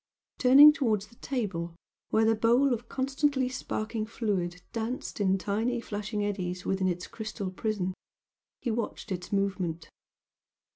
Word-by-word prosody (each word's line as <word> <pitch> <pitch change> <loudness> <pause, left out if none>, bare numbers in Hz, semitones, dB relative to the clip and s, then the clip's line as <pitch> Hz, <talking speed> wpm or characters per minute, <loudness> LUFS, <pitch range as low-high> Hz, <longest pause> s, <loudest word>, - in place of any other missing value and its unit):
Turning 280 +4 +9
towards 220 -9 0
the 225 +3 -21
table 185 -10 -3 0.3
where 220 0 +3
the 225 - +4
bowl 240 +5 +3
of 235 0 -5
constantly 270 0 +1
sparkling 225 -3 -3
fluid 190 -6 -2
danced 230 +1 -4
in 190 -1 +3
tiny 220 +6 -1
flashing 210 -1 -3
eddies 180 -3 -3
within 190 -1 +1
its 180 0 -2
crystal 215 -3 -5
prison, 190 -2 -2 0.7
he 240 - -1
watched 225 -1 -4
its 180 -1 -4
movement. 190 -5 -1
215 Hz, 135 wpm, -29 LUFS, 190-240 Hz, 0.7 s, Turning